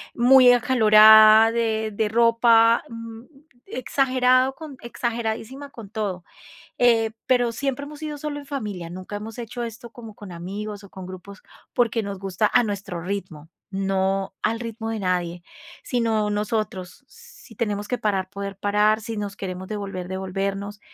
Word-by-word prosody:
muy 250 Hz, +1 st, +7 dB
acalorada 220 Hz, -2 st, +7 dB
de 220 Hz, -2 st, -1 dB
de 210 Hz, 0 st, 0 dB
ropa, 230 Hz, 0 st, +4 dB
mm, 230 Hz, 0 st, -9 dB, 0.4 s
exagerado 255 Hz, -2 st, +2 dB
con 300 Hz, -4 st, -10 dB
exageradísima 235 Hz, +3 st, -4 dB
con 230 Hz, -7 st, -11 dB
todo, 200 Hz, -5 st, -4 dB, 0.6 s
eh, 225 Hz, -2 st, +3 dB
pero 245 Hz, -2 st, +2 dB
siempre 275 Hz, +3 st, -3 dB
hemos 300 Hz, 0 st, -10 dB
sido 305 Hz, -1 st, -5 dB
solo 290 Hz, 0 st, -4 dB
en 285 Hz, -, -14 dB
familia, 205 Hz, -, -5 dB
nunca 185 Hz, +3 st, -7 dB
hemos 220 Hz, +3 st, -8 dB
hecho 240 Hz, +1 st, -6 dB
esto 230 Hz, +1 st, -9 dB
como 225 Hz, -3 st, -11 dB
con 205 Hz, -3 st, -11 dB
amigos 200 Hz, +4 st, -6 dB
o 200 Hz, -, -14 dB
con 190 Hz, -1 st, -9 dB
grupos, 185 Hz, +1 st, -11 dB, 0.3 s
porque 235 Hz, -1 st, +1 dB
nos 200 Hz, -1 st, -5 dB
gusta 195 Hz, +2 st, -1 dB
a 245 Hz, -, +5 dB
nuestro 200 Hz, -5 st, -4 dB
ritmo, 180 Hz, -4 st, -6 dB, 0.2 s
no 195 Hz, 0 st, -1 dB
al 225 Hz, +2 st, 0 dB
ritmo 225 Hz, -1 st, -5 dB
de 225 Hz, -, -3 dB
nadie, 180 Hz, -2 st, -2 dB, 0.4 s
sino 225 Hz, -3 st, 0 dB
nosotros, 210 Hz, +1 st, -3 dB
si 460 Hz, -, -16 dB
tenemos 205 Hz, -1 st, -3 dB
que 250 Hz, -, 0 dB
parar, 195 Hz, -3 st, -1 dB
poder 200 Hz, 0 st, -7 dB
parar, 210 Hz, +2 st, +2 dB
si 225 Hz, +1 st, -6 dB
nos 205 Hz, -1 st, -4 dB
queremos 185 Hz, -1 st, -6 dB
devolver, 195 Hz, -4 st, -5 dB
devolvernos. 195 Hz, +2 st, -4 dB
215 Hz, 150 wpm, -23 LUFS, 195-235 Hz, 0.6 s, muy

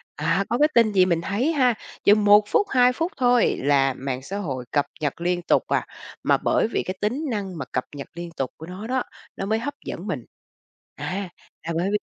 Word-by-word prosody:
À, 165 Hz, +6 st, +1 dB
có 240 Hz, -, +1 dB
cái 300 Hz, +3 st, +5 dB
tin 230 Hz, -2 st, +5 dB
gì 185 Hz, -1 st, +5 dB
mình 170 Hz, -2 st, +1 dB
thấy 220 Hz, -, 0 dB
ha, 255 Hz, -4 st, +4 dB, 0.3 s
chừng 205 Hz, +1 st, +5 dB
1 205 Hz, +1 st, +7 dB
phút, 405 Hz, -, +2 dB
2 250 Hz, -1 st, +4 dB
phút 330 Hz, +6 st, -2 dB
thôi 245 Hz, -2 st, +3 dB
là 135 Hz, -1 st, +3 dB
mạng 130 Hz, -1 st, -4 dB
xã 195 Hz, +9 st, -5 dB
hội 135 Hz, -10 st, -4 dB
cập 145 Hz, -1 st, +2 dB, 0.2 s
nhật 150 Hz, +2 st, -2 dB
liên 175 Hz, 0 st, 0 dB
tục 170 Hz, -, +2 dB
à. -, -, 0 dB, 0.4 s
Mà -, -, +4 dB
bởi -, -, +1 dB
vì -, -, -1 dB
cái 185 Hz, -, -4 dB
tính 250 Hz, +9 st, -1 dB
năng 195 Hz, -5 st, -3 dB
mà 140 Hz, -, -4 dB
cập 130 Hz, -, 0 dB
nhật 140 Hz, -, -7 dB
liên 175 Hz, 0 st, -6 dB
tục 135 Hz, -2 st, -2 dB
của 160 Hz, -, -9 dB
nó 185 Hz, +5 st, -7 dB
đó, 255 Hz, 0 st, 0 dB, 0.3 s
nó 195 Hz, -, -4 dB
mới 220 Hz, +2 st, +1 dB
hấp 285 Hz, +5 st, -3 dB
dẫn -, -, -6 dB
mình. -, -, -3 dB, 0.7 s
À, 190 Hz, +1 st, -4 dB, 0.3 s
là 165 Hz, -, -4 dB
bởi 185 Hz, +3 st, 0 dB
vì 210 Hz, -, +3 dB
195 Hz, 230 wpm, -24 LUFS, 165-235 Hz, 0.7 s, 1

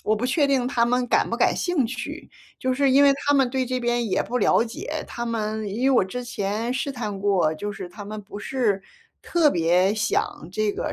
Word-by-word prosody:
我 215 Hz, -, +2 dB
不 220 Hz, +3 st, -3 dB
确 285 Hz, +3 st, +2 dB
定 270 Hz, -3 st, +1 dB
他 235 Hz, -3 st, +2 dB
们 250 Hz, +1 st, +1 dB
感 -, -, +2 dB
不 -, -, -1 dB
感 -, -, +2 dB
兴 350 Hz, -7 st, +1 dB
趣， 255 Hz, +3 st, -6 dB, 0.3 s
就 255 Hz, 0 st, 0 dB
是 275 Hz, +1 st, +2 dB
因 275 Hz, +2 st, +6 dB
为 280 Hz, -, +6 dB
他 285 Hz, +1 st, 0 dB
们 270 Hz, -2 st, +3 dB
对 260 Hz, +1 st, -1 dB
这 255 Hz, 0 st, -2 dB
边 240 Hz, -1 st, 0 dB
也 -, -, +1 dB
不 250 Hz, -, -2 dB
了 230 Hz, -, +4 dB
解。 230 Hz, -1 st, -5 dB
他 235 Hz, -, -5 dB
们 220 Hz, -2 st, -2 dB
因 220 Hz, +6 st, -3 dB
为 270 Hz, -, +4 dB
我 -, -, +3 dB
之 250 Hz, +6 st, -5 dB
前 215 Hz, +1 st, -2 dB
试 260 Hz, +2 st, -2 dB
探 215 Hz, -6 st, -4 dB
过， 190 Hz, -6 st, +2 dB
就 205 Hz, +6 st, -5 dB
是 190 Hz, -3 st, -7 dB
他 205 Hz, +3 st, -10 dB
们 210 Hz, +1 st, -6 dB
不 205 Hz, +1 st, -9 dB
是 210 Hz, -4 st, -1 dB, 0.4 s
特 335 Hz, -3 st, +3 dB
别 175 Hz, +3 st, +2 dB
想 215 Hz, -6 st, -1 dB
这 210 Hz, +2 st, 0 dB
个 -, -, -3 dB
235 Hz, 245 characters per minute, -24 LUFS, 205-255 Hz, 0.4 s, 因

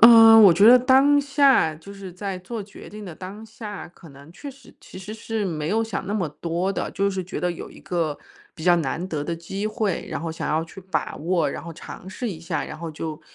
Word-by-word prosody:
嗯， 225 Hz, -1 st, +10 dB
我 190 Hz, -, +9 dB
觉 200 Hz, +5 st, +6 dB
得 250 Hz, +1 st, +9 dB
当 270 Hz, +3 st, +5 dB
下 275 Hz, -, +3 dB
就 180 Hz, +6 st, -12 dB
是 195 Hz, -2 st, -9 dB
在 195 Hz, 0 st, -5 dB
做 210 Hz, +4 st, -6 dB
决 200 Hz, -, -12 dB
定 210 Hz, 0 st, -9 dB
的 175 Hz, -, -8 dB
当 195 Hz, +6 st, -9 dB
下， 215 Hz, -4 st, -8 dB
可 170 Hz, -2 st, -16 dB
能 140 Hz, +3 st, -15 dB
确 285 Hz, +10 st, -9 dB
实 270 Hz, -1 st, -17 dB
其 -, -, -14 dB
实 190 Hz, +3 st, -7 dB
是 220 Hz, -1 st, -3 dB
没 155 Hz, -4 st, -3 dB
有 220 Hz, +3 st, +1 dB
想 220 Hz, -4 st, -4 dB
那 205 Hz, -, -2 dB
么 180 Hz, -7 st, -1 dB
多 170 Hz, +5 st, -2 dB
的， -, -, -3 dB
就 200 Hz, 0 st, +1 dB
是 190 Hz, -1 st, -3 dB
觉 180 Hz, -, -5 dB
得 180 Hz, -, 0 dB
有 170 Hz, -, -7 dB
一 -, -, -14 dB
个 165 Hz, -4 st, -2 dB, 0.4 s
比 160 Hz, -, -10 dB
较 175 Hz, 0 st, +5 dB
难 160 Hz, +2 st, -2 dB
得 150 Hz, -4 st, -3 dB
的 170 Hz, -, -2 dB
机 195 Hz, +5 st, -5 dB
会， 215 Hz, -4 st, -2 dB
然 -, -, -4 dB
后 165 Hz, 0 st, -3 dB
想 160 Hz, -, -4 dB
要 155 Hz, +2 st, +1 dB
去 170 Hz, +4 st, -12 dB
把 190 Hz, +1 st, -3 dB
握， 165 Hz, -2 st, 0 dB
然 -, -, -6 dB
后 170 Hz, 0 st, -8 dB
尝 175 Hz, +3 st, -10 dB
试 215 Hz, +4 st, -4 dB
一 165 Hz, -, -7 dB
下。 165 Hz, 0 st, -3 dB
然 -, -, -8 dB
后 170 Hz, -, -5 dB
就 155 Hz, +1 st, -6 dB
190 Hz, 265 characters per minute, -23 LUFS, 165-215 Hz, 0.4 s, 嗯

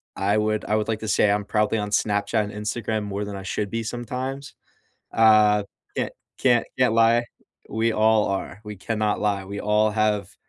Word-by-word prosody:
I 100 Hz, +2 st, +1 dB
would 110 Hz, 0 st, 0 dB
I 105 Hz, -, +1 dB
would 105 Hz, -, -1 dB
like 110 Hz, -1 st, -1 dB
to 110 Hz, -, -5 dB
say 100 Hz, -, +3 dB
I'm 105 Hz, 0 st, +1 dB
probably 105 Hz, +1 st, 0 dB
on 105 Hz, -1 st, -2 dB
Snapchat 105 Hz, +1 st, +1 dB
and 105 Hz, -, -7 dB
Instagram 105 Hz, +1 st, -3 dB
more 100 Hz, 0 st, -4 dB
than 100 Hz, -, -6 dB
I 95 Hz, -, -7 dB
should 100 Hz, +1 st, -3 dB
be 115 Hz, +2 st, -3 dB
sometimes. 130 Hz, +4 st, -5 dB, 0.6 s
Uh, 105 Hz, -2 st, +5 dB, 0.3 s
can't -, -, -2 dB, 0.3 s
can't 120 Hz, -3 st, +3 dB
can't 125 Hz, -3 st, +3 dB
lie. 115 Hz, +1 st, +4 dB, 0.4 s
We 115 Hz, +1 st, 0 dB
all 110 Hz, 0 st, +3 dB
are, 100 Hz, +1 st, -4 dB
we 105 Hz, 0 st, -7 dB
cannot 105 Hz, +2 st, -1 dB
lie, 100 Hz, -2 st, 0 dB
we 100 Hz, +1 st, -6 dB
all 105 Hz, +1 st, +2 dB
have 105 Hz, -2 st, 0 dB
105 Hz, 190 wpm, -24 LUFS, 105-115 Hz, 0.6 s, Uh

